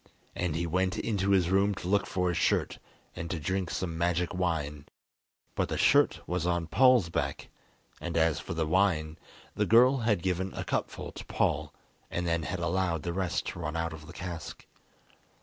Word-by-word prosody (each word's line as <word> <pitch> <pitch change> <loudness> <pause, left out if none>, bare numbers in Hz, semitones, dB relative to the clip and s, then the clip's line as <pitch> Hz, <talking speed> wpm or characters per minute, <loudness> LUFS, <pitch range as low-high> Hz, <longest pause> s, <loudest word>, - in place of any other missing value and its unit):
And 90 -4 -1
he 85 +1 -1
went 95 +3 0
into 100 -3 -1
his 95 -3 +3
room 100 +1 +3
to 90 - -6
look 100 +2 +2
for 90 -1 0
his 85 - -1
shirt - - +1 0.4
and 85 - -5
to 90 - -2
drink 95 +3 -1
some 85 -3 -3
magic 85 0 0
wine, 80 -6 -2 0.7
but - - -1
the - - -2
shirt - - +4
was 90 -1 -1
on 85 -1 0
Paul's 125 0 +4
back, - - -3 0.5
and 85 -1 -3
as 80 -1 +3
for - - -6
the 80 -1 0
wine, 80 -2 +1 0.3
the - - 0
girl 125 +4 +6
had 110 -7 +1
given 95 0 -1
a - - -3
cupful - - -3
to - - -9
Paul - - 0 0.4
and 85 - -2
then 85 -1 +1
had 90 +4 -3
allowed 85 -1 0
the 85 - -2
rest 95 -1 -1
to - - -7
run 80 -1 -3
out 80 -1 -2
of 75 -1 -10
the 85 - -10
cask. 85 -3 -7
85 Hz, 190 wpm, -29 LUFS, 80-95 Hz, 0.7 s, girl